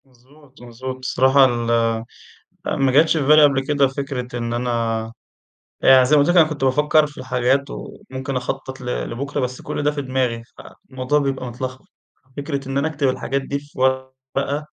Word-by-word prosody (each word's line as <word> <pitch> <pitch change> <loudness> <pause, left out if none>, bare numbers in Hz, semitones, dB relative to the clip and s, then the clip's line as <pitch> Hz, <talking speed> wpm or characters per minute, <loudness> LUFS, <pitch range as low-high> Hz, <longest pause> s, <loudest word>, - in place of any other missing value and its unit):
مضبوط، 135 +2 -22
مضبوط، 125 +2 -7
الصراحة 130 +1 +4
ال 120 -2 0 1.0
ما 135 -1 +1
جاتش 160 +4 +4
في 155 - +1
بالي 155 +1 +7
قبل 135 -2 +3
كده 145 -2 +3
فكرة 130 -3 -5
إن 115 0 -3
أنا 115 -2 -1 0.7
يعني 130 -1 +7
زي 145 +4 +4
ما 145 - +6
قُلت 145 - +2
لَك 175 - +3
أنا 160 -3 +7
كنت 145 -3 -5
بافكر 150 +3 +3
في 145 - -16
الحاجات 130 +2 0
وممكن 130 +1 -7
أخطط 130 +1 -4
ل - - -9 0.2
لبُكرة 140 +5 -4
بس 125 0 -3
كل - - -4
ده 150 - +2
في 145 -1 -4
دماغي، 130 -3 -1
فالموضوع 130 +2 -3
بيبقى 135 -2 -2
متلخبط، 130 +2 -6 0.5
فكرة 140 -2 -4
إن 135 - -1
أنا 140 +3 +1
أكتب 145 -3 0
الحاجات 135 +1 -2
دي 140 +1 -3
في 145 -1 -15
ورقة 130 +2 -1
130 Hz, 175 wpm, -21 LUFS, 125-145 Hz, 1.0 s, بالي